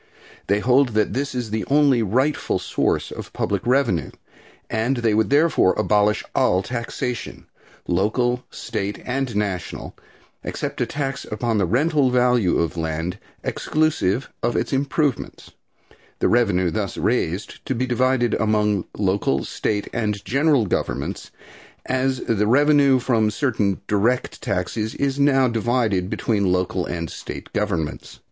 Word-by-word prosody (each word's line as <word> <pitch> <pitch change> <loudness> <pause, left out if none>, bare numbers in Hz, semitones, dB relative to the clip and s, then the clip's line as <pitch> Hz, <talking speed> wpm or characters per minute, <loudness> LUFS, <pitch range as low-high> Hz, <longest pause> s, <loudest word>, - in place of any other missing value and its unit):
They 100 +1 +2
hold 130 +3 +4
that 110 -1 +1
this 135 +1 -2
is 120 -4 -3
the 110 0 -1
only 140 -4 +4
rightful 130 +8 +1
source - - -1
of - - -8
public 100 -2 -1
revenue, 120 - +2 0.6
and 120 +4 0
they 115 -2 +1
would 110 +1 +2
therefore 145 - +3
abolish 105 0 +2
all 95 +1 +2
taxation 120 +1 -4 0.4
local, 120 +7 +1
state 105 -2 -4
and 130 -2 -2
national 100 -4 -3 0.5
except - - -4
a - - +1
tax 135 -2 -3
upon 110 0 -1
the 95 - +1
rental 145 - +2
value 125 -6 +3
of 85 0 -1
land 80 +3 -3 0.2
exclusive 140 -7 0
of 120 +1 0
its - - -1
improvements, 140 0 -1 0.7
the - - +1
revenue 100 -7 +2
thus - - -3
raised 90 +6 -1
to 135 - 0
be 125 +2 0
divided 125 -1 +1
among 105 -2 +1
local, 95 -9 +1
state 105 -1 -2
and 105 -3 -2
general 140 -2 +3
governments, 90 - -3 0.6
as 130 0 0
the 105 -2 0
revenue 140 +1 +5
from 115 -4 +1
certain 105 -5 0
direct 110 +5 0
taxes 110 0 -2
is 140 0 -1
now 135 -2 +4
divided 115 -5 0
between 100 -5 0
local 90 0 0
and 85 -2 -4
state - - -8
governments. 80 -3 -3
115 Hz, 135 wpm, -22 LUFS, 100-130 Hz, 0.7 s, revenue